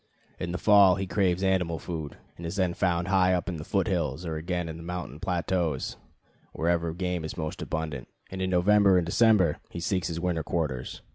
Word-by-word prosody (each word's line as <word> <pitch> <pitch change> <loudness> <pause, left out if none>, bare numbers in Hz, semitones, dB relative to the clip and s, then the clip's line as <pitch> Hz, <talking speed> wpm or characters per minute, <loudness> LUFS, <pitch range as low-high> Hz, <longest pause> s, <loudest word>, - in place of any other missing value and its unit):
In 85 - -3
the 90 - -2
fall 100 -2 +6
he 95 0 -2
craves 95 -1 +1
animal 90 -3 +1
food, 80 -4 -6 0.2
and 85 - -11
is 85 +2 -4
then 95 -3 +1
found 90 -1 0
high 95 -2 +4
up 90 - -2
in 90 -4 -3
the 75 - -6
foot 95 +4 0
hills, 85 - -1
or 80 -1 -3
again 85 +2 -2
on 80 0 -6
the - - -9
mountain 85 -4 -6
plateaus, 90 -5 -1 0.6
wherever 85 0 0
game 90 -2 -2
is 80 - -6
most 80 -2 -4
abundant; 75 -5 -4 0.2
and 95 0 -5
in 95 - 0
November 95 +1 +5
and 90 - +1
December 95 -2 +4
he - - -6
seeks 90 +1 -1
his 85 -1 -3
winter 85 -2 -1
quarters. 75 -7 -3
90 Hz, 205 wpm, -27 LUFS, 80-95 Hz, 0.6 s, fall